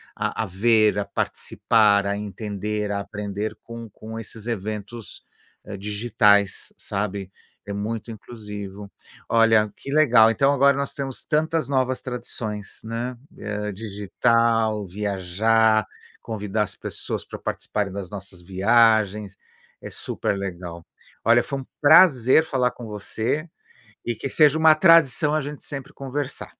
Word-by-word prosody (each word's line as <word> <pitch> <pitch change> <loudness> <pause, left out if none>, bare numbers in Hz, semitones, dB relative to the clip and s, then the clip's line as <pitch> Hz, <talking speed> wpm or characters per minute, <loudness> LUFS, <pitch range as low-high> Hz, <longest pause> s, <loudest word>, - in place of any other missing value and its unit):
a 110 - -2
a - - -3
ver, 110 +2 +3
a 100 - +1
participar, 105 -3 +1
a 100 - 0
entender, 105 +1 -4
a 100 -1 -2
aprender 105 +1 -4
com 115 -1 -9
com 110 +3 -9
esses 115 0 -9
eventos, 110 +1 -5 0.4
eh, 105 - -7
digitais, 105 -1 +1
sabe. 100 -1 -4 0.4
É 100 - -4
muito 110 +3 -4
inclusivo. 105 -3 -9 0.4
Olha, 115 -2 +4
que 140 - -7
legal. 125 -7 +6
Então 135 +5 +3
agora 140 0 +4
nós 140 0 -2
temos 135 -2 -5
tantas 160 0 0
novas 130 -1 0
tradições, 110 -4 -6
né, 115 +3 -4 0.2
eh, 105 0 -4
digital, 110 +1 0
viajar, 105 +3 +1 0.3
convidar 105 -1 -2
as 95 - -6
pessoas - - -4
pra - - -9
participarem 100 -2 -3
das 100 -3 -6
nossas 95 -3 -9
viagens. 105 +1 +2 0.4
É - - -8
super - - -3
legal. 85 -3 -6 0.4
Olha, 115 +1 +5
foi 140 -1 -4
um 130 - -9
prazer 150 -3 +6
falar 125 -5 0
com 120 -2 -10
você 110 - -3 0.6
e 120 - -1
que 115 - -5
seja 150 +1 +4
uma 160 -1 +6
tradição 155 -3 +5
a 155 - +2
gente 145 +1 -7
sempre 140 -2 -7
conversar. 135 +1 -5
110 Hz, 135 wpm, -23 LUFS, 100-125 Hz, 0.6 s, legal